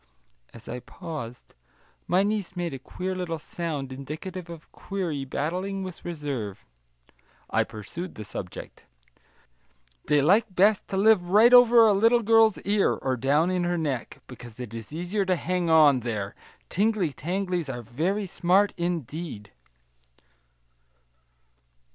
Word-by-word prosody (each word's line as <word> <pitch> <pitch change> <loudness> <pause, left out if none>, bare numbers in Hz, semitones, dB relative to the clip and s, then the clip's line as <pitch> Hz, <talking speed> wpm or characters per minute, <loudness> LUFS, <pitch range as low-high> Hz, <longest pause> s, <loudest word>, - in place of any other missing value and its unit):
As 115 0 -14
I 125 - -5
paused, 140 -3 -8 0.5
my 185 +2 +3
niece 205 -3 -2
made 175 -3 -3
a 135 - -6
queer 185 +8 -5
little 180 -3 -3
sound 150 -4 -5
indicative 165 +7 -7
of 165 -2 -11
query 170 -8 -4
battling 185 +8 -3
with 185 -2 -8
reserve. 140 - -5 0.9
I - - +3
pursued 170 - -8
the 110 - -7
subject: 95 -2 -8 1.2
"They 145 -1 +3
like 200 +5 +3
best 200 +3 +3
to 190 - -3
live 195 -3 +4
right 220 +6 +6
over 240 -2 +8
a 215 - +5
little 230 +4 +4
girl's 225 -1 +5
ear, 200 0 +2
or 130 -1 -2
down 145 +8 +2
in 180 -1 0
her 175 0 0
neck, 145 -7 -3
because 120 -2 -12
it 120 -3 -7
is 115 +1 -8
easier 175 +6 -2
to 185 -1 +1
hang 180 -1 -1
on, 150 -5 +6
there; 110 -4 -4 0.3
tingly 200 -5 0
tanglies 180 +1 -2
are 120 -2 -5
very 170 - -1
smart, 190 +3 +2
indeed." 160 - -4
170 Hz, 135 wpm, -26 LUFS, 135-195 Hz, 1.2 s, over